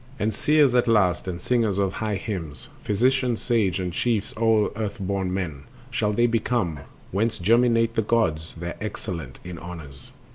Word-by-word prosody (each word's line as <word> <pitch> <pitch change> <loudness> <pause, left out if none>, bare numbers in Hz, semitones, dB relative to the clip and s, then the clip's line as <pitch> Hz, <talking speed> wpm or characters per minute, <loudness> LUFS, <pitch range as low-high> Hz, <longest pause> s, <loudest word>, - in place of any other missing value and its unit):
And 110 -1 0
seers 150 +2 +4
at 125 0 +3
last, 95 -6 +3
and 90 -1 -3
singers 110 -2 +1
of 100 -1 +1
high 110 -2 -2
hymns, 90 -7 -5
Physicians 125 +3 +2
sage, 105 -7 +1
and 90 -2 -3
chiefs 110 +1 0
o'er 110 -1 +3
earth 105 -2 -3
born 95 -1 -1
men 80 -7 -3 0.3
Shall 110 -4 +1
they 120 +3 +3
become, 115 - 0 0.3
whence 110 +4 0
germinate 115 +3 +3
the 115 - +2
gods, 90 -9 0
The 85 +2 -6
excellent 80 - -5
in 90 -2 -7
honors. 80 -6 -9
105 Hz, 160 wpm, -25 LUFS, 90-115 Hz, 0.3 s, seers